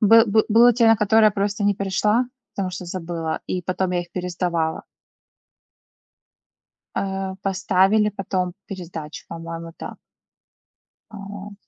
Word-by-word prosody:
Бы 225 +1 +7
бы 215 +1 +3
было 235 +2 +7
те, 230 0 +3
на 225 0 +6
которые 215 +1 +4
я - - +6
просто 205 +1 -1
не 205 0 +3
пришла, 210 +5 +1 0.3
потому 190 -2 -2
что 180 0 -6
забыла, 165 -2 -4
и 180 -1 -2
потом 185 +1 -1
я 175 - +1
их 175 - -16
пересдавала. 175 -3 -2 2.1
А, 190 -1 -2
поставили 195 +2 +3
потом 185 -3 -2
пересдачу, 165 -5 -7
по-моему, 165 0 -7
да. - - -7 1.2
Вот. 200 0 -8
195 Hz, 130 wpm, -22 LUFS, 175-210 Hz, 2.1 s, Бы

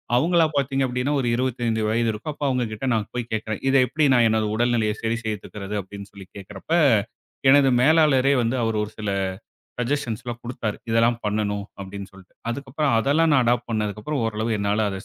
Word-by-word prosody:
அவங்களா 165 +5 +3
பார்த்தீங்க 135 -1 +1
அப்படின்னா 125 +3 -1
ஒரு 125 - -2
25 120 -3 -1
வயது 115 +1 +1
இருக்கும். 130 +8 -5
அப்ப 145 - -4
அவங்ககிட்ட 125 -1 -2
நான் 110 -2 -1
போய்க் 120 -1 -4
கேக்குறேன். 110 -1 -3
இதை 135 0 +5
எப்படி 155 +4 +1
நான் 120 -2 +5
எனது 110 -1 +1
உடல்நிலையைச் 115 -2 0
சரி 115 +1 0
செய்துக்கிறது 105 -1 -5
அப்படின்னு 100 +1 -10
சொல்லிக் 95 -2 -14
கேக்குறப்ப, 100 - -11 0.8
எனது 140 -1 +6
மேலாளரே 140 -2 +4
வந்து 115 +2 0
அவர் 115 -1 0
ஒரு 105 - -6
சில 105 -2 -3 0.7
சஜ்ஜஷன்ஸ் 125 -3 -2
எல்லாம் 120 -1 -6
குடுத்தாரு. 115 -3 -4
இதெல்லாம் 115 +1 +3
பண்ணனும் 105 -1 -1 0.2
அப்படின்னு 100 0 -8
சொல்லிட்டு. 95 -1 -17 0.2
அதுக்கப்புறம் 140 +1 -1
அதெல்லாம் 155 +6 +2
நான் 130 -3 +4
அடாப்ட் 120 0 +1
பண்ணதுக்கப்புறம் 110 +5 -2
ஓரளவு 110 +1 -2
என்னால 100 +2 +1
அதை 95 - -5
115 Hz, 170 wpm, -23 LUFS, 105-130 Hz, 0.8 s, எனது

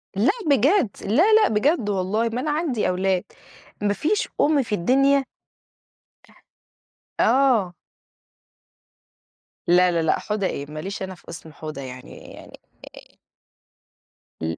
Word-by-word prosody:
لا 215 +7 +3 0.2
بجد، 280 - +3 0.2
لا، 330 - +3
لا، 435 0 +5
بجد 220 +1 +1
والله 205 +4 0
ما 240 +3 -3
أنا 300 +2 -2
عندي 295 -7 -1
أولاد، 185 0 0 0.6
مفيش 210 - 0
أم 290 -2 +3
في 220 -3 -2
الدنيا 275 +8 +2 2.0
أح - - +4
آه. 240 -10 +2 1.9
لا، 180 +1 +4
لا، 170 -1 0
لا، 160 - +1
حودة 210 -2 -2
إيه! 140 - -5
ما 155 - -6
ليش 195 +4 -5
أنا 190 -1 -6
في - - -19
اسم 160 -2 -10
حودة 155 -2 -8
يعني 130 -1 -10 0.2
يعني - - -14 0.4
آآ - - -25 1.3
ال 80 0 -3
210 Hz, 130 wpm, -23 LUFS, 180-275 Hz, 2.0 s, لا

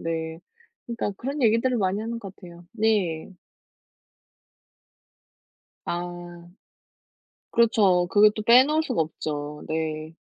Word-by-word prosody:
네. 160 -1 -4 0.5
그니까 235 -3 -3
그런 275 +5 -4
얘기들을 230 +3 +2
많이 195 -1 0
하는 230 +1 -5
것 195 -3 -9
같아요. 175 -2 -13
네. 210 -8 0 2.6
아 175 0 -6 1.0
그렇죠. 205 -7 +3
그걸 210 +1 +6
또 215 - -3
빼놓을 265 +7 +5
수가 250 - -1
없죠. 150 -1 -5
네. 155 0 -3
190 Hz, 200 characters per minute, -25 LUFS, 165-230 Hz, 2.6 s, 그걸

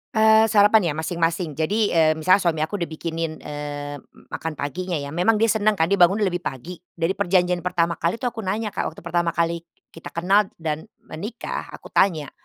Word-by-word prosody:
Eee, 220 0 +6
sarapan 210 -2 +5
ya, 150 - 0
masing-masing, 165 +1 -1
jadi, 160 +8 -1
mmm, 155 -1 +2
misalnya 185 +4 +5
suami 165 -4 0
aku 200 +6 -3
udah 170 - -2
bikinin, 160 0 -5
eee, 145 -1 -6
m - - -22
makan 165 -1 -4
paginya 175 +6 -3
ya. 140 -2 -4
Memang 180 +8 +2
dia 225 +1 +3
senang 215 -1 +2
kan, 165 0 0
dia 200 - +2
bangun 190 +5 +5
lebih 180 -3 0
pagi. 170 +2 -6 0.2
Dari 165 +1 0
perjanjian 180 -2 +1
pertama 170 -1 -1
kali 170 +4 0
itu 230 - -15
aku 240 -2 -2
nanya, 210 +2 -2
Kak, - - -2
waktu 160 - -10
pertama 170 0 -1
kali 170 0 0 0.3
kita 165 - -11
kenal 195 +4 +3
dan 160 +3 -4 0.2
menikah, 205 +9 -6
aku - - -14
tanya, 160 -8 +2
175 Hz, 200 wpm, -23 LUFS, 160-200 Hz, 0.3 s, Eee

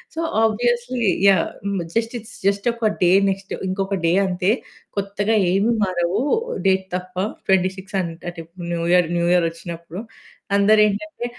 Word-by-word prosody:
So 330 - -2 0.2
obviously 240 +2 0 0.2
yeah! 190 -4 +4 0.5
Just 230 +1 0
it's 220 - -12
just 200 +3 +1
ఒక 230 -2 0
day 175 - +5 0.2
next 195 0 -4
ఇంకొక 195 +1 -1
day 165 - +3
అంతే. 185 +2 +1 0.5
కొత్తగా 200 +2 0 0.2
ఏమి 200 +5 +2
మారవు 185 +3 0 0.5
డేట్ 190 0 +2
తప్ప. 180 0 -6 0.3
26 190 +1 0
అంటే 170 0 -6 0.3
న్యూ 170 -1 -1
ఇయర్ 180 -2 +4
న్యూ 170 - +1
ఇయర్ 175 -2 +3
వచ్చినప్పుడు. 170 +2 -8 0.5
అందరేంటంటే! 210 +2 +2
195 Hz, 130 wpm, -21 LUFS, 180-215 Hz, 0.5 s, day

